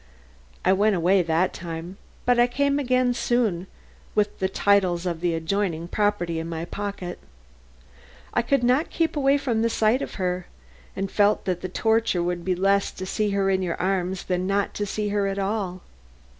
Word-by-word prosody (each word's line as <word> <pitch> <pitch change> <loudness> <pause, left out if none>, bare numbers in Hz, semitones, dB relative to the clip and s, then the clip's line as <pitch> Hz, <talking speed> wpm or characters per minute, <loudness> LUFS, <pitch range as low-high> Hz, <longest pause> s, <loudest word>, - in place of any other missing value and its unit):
I 185 - +5
went 205 +2 +3
away 180 +2 +3
that 170 +2 +1
time, 170 +2 -7 0.3
but 245 -1 +3
I 240 - +6
came 280 +3 +1
again 255 -2 +2
soon 225 -8 0 0.5
with 210 -1 +1
the 190 - 0
titles 190 -3 +2
of 170 -2 -2
the 175 -2 +1
adjoining 170 0 -1
property 190 -4 0
in 165 +1 -5
my 165 0 -4
pocket. 200 -2 -5 1.1
I - - +3
could 260 +2 +1
not 255 +6 +2
keep 330 -1 0
away 280 -1 +3
from 245 -6 -1
the 230 - +2
sight 225 +3 +2
of - - -5
her, 180 -1 -2 0.5
and 195 0 -3
felt 205 0 +2
that 180 -2 -1
the 185 - -4
torture 220 -2 +1
would 175 0 -2
be 185 0 0
less 195 +2 +2
to 185 - -6
see 210 +2 0
her 195 -1 +1
in 190 0 +1
your 175 -2 -2
arms 185 0 -1
than 180 0 -1
not 200 0 0
to 205 - -3
see 210 +1 -2
her 200 -1 +1
at 195 0 -2
all." 195 -2 -2
195 Hz, 185 wpm, -24 LUFS, 180-220 Hz, 1.1 s, I